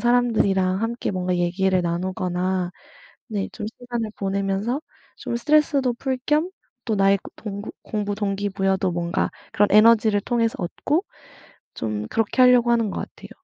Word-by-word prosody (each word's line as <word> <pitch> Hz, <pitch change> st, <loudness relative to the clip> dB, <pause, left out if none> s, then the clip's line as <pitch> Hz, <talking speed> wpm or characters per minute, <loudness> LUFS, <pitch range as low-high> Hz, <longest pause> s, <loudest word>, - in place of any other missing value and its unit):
사람들이랑 215 Hz, -6 st, +2 dB
함께 235 Hz, +2 st, -2 dB
뭔가 180 Hz, -1 st, -1 dB
얘기를 185 Hz, +2 st, +1 dB
나누거나 180 Hz, +1 st, -1 dB, 0.6 s
네 205 Hz, -4 st, -2 dB
좀 210 Hz, -, -6 dB
시간을 240 Hz, -2 st, -5 dB
보내면서 200 Hz, +6 st, -1 dB, 0.4 s
좀 235 Hz, -, -4 dB
스트레스도 285 Hz, -1 st, +2 dB
풀 260 Hz, +1 st, -2 dB
겸 310 Hz, +4 st, +2 dB, 0.3 s
또 225 Hz, -, 0 dB
나의 195 Hz, 0 st, +4 dB, 0.2 s
동구 205 Hz, 0 st, -6 dB
공부 205 Hz, -1 st, -2 dB
동기부여도 195 Hz, -2 st, 0 dB
뭔가 170 Hz, 0 st, -1 dB, 0.2 s
그런 205 Hz, 0 st, +3 dB
에너지를 215 Hz, -1 st, +5 dB
통해서 230 Hz, -1 st, 0 dB
얻고 295 Hz, -, -1 dB, 0.7 s
좀 105 Hz, -1 st, -3 dB
그렇게 225 Hz, +3 st, +1 dB
할려고 250 Hz, -1 st, +5 dB
하는 230 Hz, -3 st, +2 dB
것 -, -, -4 dB
같아요. -, -, -9 dB
205 Hz, 315 characters per minute, -23 LUFS, 190-235 Hz, 0.7 s, 에너지를